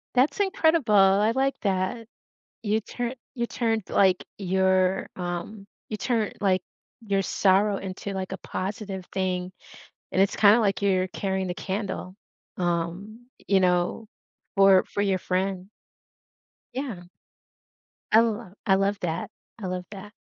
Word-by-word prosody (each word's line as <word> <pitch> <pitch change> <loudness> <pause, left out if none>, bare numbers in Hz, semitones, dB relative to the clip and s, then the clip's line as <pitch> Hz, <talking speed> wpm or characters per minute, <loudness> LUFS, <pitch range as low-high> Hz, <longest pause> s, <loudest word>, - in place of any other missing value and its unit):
That's 265 +10 +3
incredible, 320 - +2
I 195 +2 +5
like 270 +3 +1
that. 195 +3 -1 0.5
You 215 0 0
turn 240 +4 -4 0.2
you 235 -2 -2
turned, 225 -3 -1
like, 190 -2 +3
your, 190 0 +1
um 180 +3 -5 0.2
you 215 - -3
turn, 225 -1 0
like, 190 -2 +2 0.4
your 200 -3 0
sorrow 195 +2 +3
into, 195 +1 -6
like, 190 -1 -4
a 190 - -4
positive 195 -1 -5
thing, 185 -1 -1 0.6
and 190 - +3
it's 195 - +1
kinda, 210 +2 +6
like, 200 -3 +1
you're 190 -2 +2
carrying 190 0 -2
the 175 - -2
candle, 190 -1 -4 0.4
um, 180 +6 -3 0.2
you 195 -1 +4
know, 180 +4 +1 0.5
for 195 -1 +6
for 205 - -2
your 195 -2 +1
friend. 185 +1 -2 1.1
Yeah. 250 -10 -5 1.1
I 215 - +7
l 225 -4 -1
I 195 - +6
love 195 +1 +1
that, 170 0 -2 0.3
I 195 - -4
love 180 0 -4
that. 205 0 -9
195 Hz, 135 wpm, -26 LUFS, 185-215 Hz, 1.1 s, I